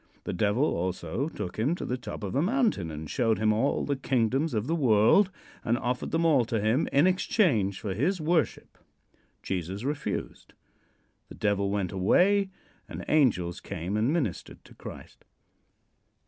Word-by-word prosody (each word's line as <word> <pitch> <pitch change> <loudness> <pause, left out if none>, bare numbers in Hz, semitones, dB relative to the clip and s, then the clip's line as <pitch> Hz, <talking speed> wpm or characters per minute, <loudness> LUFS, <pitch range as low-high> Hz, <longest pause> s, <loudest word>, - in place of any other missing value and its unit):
The - - -4
Devil 105 +8 +1
also 90 - -2
took 105 - -6
him 140 +10 +1
to - - -6
the 125 - -1
top 125 -3 -7
of 100 - -4
a 135 - +2
mountain 215 - +1
and 80 0 -7
showed 115 +5 +1
him 110 0 +2
all 115 +6 0
the 140 - 0
kingdoms 135 +2 0
of 105 0 -1
the 160 - -1
world 130 - +4 0.3
and 120 +1 +1
offered 125 +1 -2
them 165 +1 0
all 145 -6 +4
to 115 0 -1
him 110 +8 +1
in 140 +4 +4
exchange 155 - +2
for 100 -3 -3
his 170 - 0
worship. 160 0 -1 0.6
Jesus 95 +3 -4
refused. 145 +2 -4 0.8
The - - -10
Devil 100 -1 0
went 100 -2 -1
away 190 - +3 0.4
and - - -7
angels 105 - +2
came 90 +5 -4
and 110 +6 +1
ministered 145 - -3
to - - -16
Christ. - - -11
120 Hz, 160 wpm, -28 LUFS, 100-155 Hz, 0.8 s, world